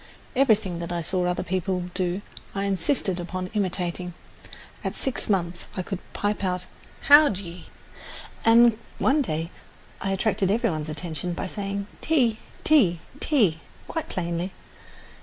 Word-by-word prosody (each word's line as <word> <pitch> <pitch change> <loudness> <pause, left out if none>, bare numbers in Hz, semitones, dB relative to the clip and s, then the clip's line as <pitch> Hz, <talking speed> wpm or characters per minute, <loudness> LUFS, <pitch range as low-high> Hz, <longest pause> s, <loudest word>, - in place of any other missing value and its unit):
Everything 215 -9 +3
that 170 0 -4
I 175 -1 -1
saw 180 +2 0
other 180 - 0
people 185 -1 -2
do 185 +1 -1 0.3
I 195 - 0
insisted 195 - 0
upon 185 +1 -4
imitating. 180 -3 -2 0.7
At - - -2
six 265 -4 -2
months 175 -3 0
I 185 - -1
could 195 0 -4
pipe 205 0 -1
out 185 -1 +3 0.4
"How 290 +1 +8
d'ye," 180 -3 -6 0.8
and 230 0 +6 0.2
one 290 +3 +3
day 165 - -2 0.5
I 195 - -1
attracted 195 0 +1
every 230 +1 +2
one's 155 -1 -3
attention 160 +2 -3
by 170 - -3
saying 200 +1 -3 0.2
"Tea, 245 -9 +2 0.2
tea, 210 - +5 0.2
tea" 210 - +3 0.3
quite 325 - -4
plainly. 175 +1 -2
185 Hz, 140 wpm, -25 LUFS, 175-215 Hz, 0.8 s, How